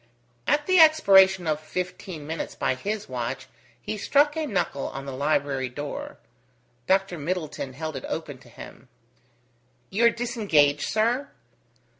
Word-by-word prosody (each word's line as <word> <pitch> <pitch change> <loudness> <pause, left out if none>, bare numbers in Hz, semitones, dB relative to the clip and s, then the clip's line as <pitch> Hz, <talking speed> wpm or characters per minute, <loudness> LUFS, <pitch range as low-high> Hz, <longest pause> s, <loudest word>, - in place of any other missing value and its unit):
At 295 0 +2
the 370 -1 +4
expiration 195 - +6
of 155 -1 0
fifteen 180 0 -6
minutes 160 +2 -5
by - - 0
his 205 +11 -4
watch, 130 +1 -4 0.3
he 210 - -5
struck 290 +6 +3
a 315 -1 -2
knuckle 180 - -1
on 135 0 -7
the 140 - -5
library 140 -1 0
door. 145 +3 -6 0.7
Dr. 190 -3 +1
Middleton 150 -4 -4
held 155 +2 -5
it 135 - -6
open 145 -5 -5
to 125 - -18
him. 125 +2 -12 1.0
"You 225 +5 +2
are - - +8
disengaged, 205 - +1
sir?" 235 +6 +1
165 Hz, 140 wpm, -25 LUFS, 140-215 Hz, 1.0 s, are